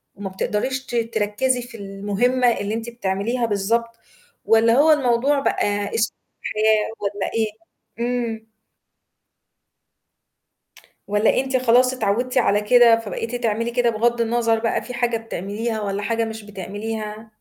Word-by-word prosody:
وما 195 Hz, -1 st, -6 dB
بتقدريش 255 Hz, +7 st, -2 dB
ت 240 Hz, -, -6 dB
تركّزي 230 Hz, +2 st, 0 dB
في 240 Hz, -1 st, -10 dB
المهمة 205 Hz, +5 st, 0 dB
اللي 205 Hz, +2 st, -2 dB
أنتِ 230 Hz, +1 st, -4 dB
بتعمليها 230 Hz, +2 st, -1 dB
بالضبط، 230 Hz, +3 st, -1 dB, 0.5 s
والَّا 225 Hz, +1 st, +4 dB
هو 295 Hz, +5 st, +5 dB
الموضوع 275 Hz, 0 st, +2 dB
بقى 205 Hz, -6 st, -1 dB
أسلوب 225 Hz, -, -1 dB, 0.2 s
حياة 215 Hz, 0 st, +1 dB
والَّا 200 Hz, -1 st, -3 dB
إيه؟ 225 Hz, -1 st, +1 dB, 0.5 s
إمم. 235 Hz, -2 st, -3 dB, 2.6 s
والَّا 205 Hz, +4 st, +2 dB
أنتِ 265 Hz, -1 st, -1 dB
خلاص 255 Hz, +1 st, +4 dB
اتعوّدتِ 245 Hz, +2 st, 0 dB
على 205 Hz, -4 st, +3 dB
كده 235 Hz, +1 st, +6 dB
فبقيتِ 230 Hz, +2 st, -5 dB
تعملي 230 Hz, -1 st, -1 dB
كده 240 Hz, -1 st, +2 dB
بغضّ 235 Hz, +2 st, +1 dB
النَظَر 230 Hz, 0 st, +1 dB
بقى 225 Hz, 0 st, -1 dB
في 250 Hz, -, -8 dB
حاجة 240 Hz, -1 st, 0 dB
بتعمليها 220 Hz, +1 st, -4 dB
والَّا 200 Hz, -1 st, -3 dB
حاجة 230 Hz, +2 st, 0 dB
مش 220 Hz, -1 st, -7 dB
بتعمليها؟ 210 Hz, +2 st, -6 dB
225 Hz, 130 wpm, -22 LUFS, 210-240 Hz, 2.6 s, كده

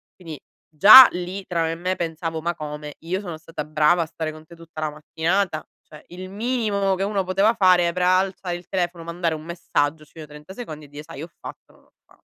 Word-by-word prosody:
quindi 165 Hz, -6 st, -10 dB, 0.3 s
già 215 Hz, -, +10 dB
lì 180 Hz, +2 st, -6 dB
tra 170 Hz, -2 st, -2 dB
me 160 Hz, -, -1 dB
e -, -, -5 dB
me 180 Hz, +2 st, -2 dB
pensavo: 165 Hz, -1 st, -4 dB
“Ma 170 Hz, +1 st, -2 dB
come? 150 Hz, -1 st, -7 dB
Io 175 Hz, +4 st, -3 dB
sono 175 Hz, -5 st, -7 dB
stata 160 Hz, -1 st, -7 dB
brava 155 Hz, +3 st, +2 dB
a -, -, -1 dB
stare 160 Hz, -1 st, -5 dB
con 155 Hz, 0 st, -14 dB
te 170 Hz, -, -14 dB
tutta 165 Hz, -1 st, -11 dB
la 155 Hz, -, -1 dB
mattinata, 160 Hz, +3 st, -2 dB, 0.2 s
cioè 150 Hz, -, -15 dB
il 185 Hz, +1 st, -9 dB
minimo 210 Hz, -3 st, -1 dB
che 190 Hz, -, -3 dB
uno 200 Hz, -1 st, -1 dB
poteva 195 Hz, +4 st, +2 dB
fare 185 Hz, -5 st, +4 dB
era 180 Hz, +1 st, +2 dB
alzare 185 Hz, -1 st, -2 dB
il 175 Hz, 0 st, -11 dB
telefono, 175 Hz, -2 st, -3 dB
mandare 170 Hz, -1 st, -2 dB
un 155 Hz, -, -9 dB
messaggio 160 Hz, -3 st, -2 dB
sui 155 Hz, +1 st, -12 dB
30 150 Hz, +4 st, -13 dB
secondi 155 Hz, -11 st, -8 dB
e -, -, -15 dB
dire: 145 Hz, +1 st, -10 dB
'Sai 155 Hz, -3 st, -10 dB
ho 165 Hz, -, -8 dB
fatto, -, -, -11 dB
non -, -, -25 dB
ho -, -, -32 dB
fa'” -, -, -26 dB
170 Hz, 225 wpm, -22 LUFS, 155-185 Hz, 0.3 s, già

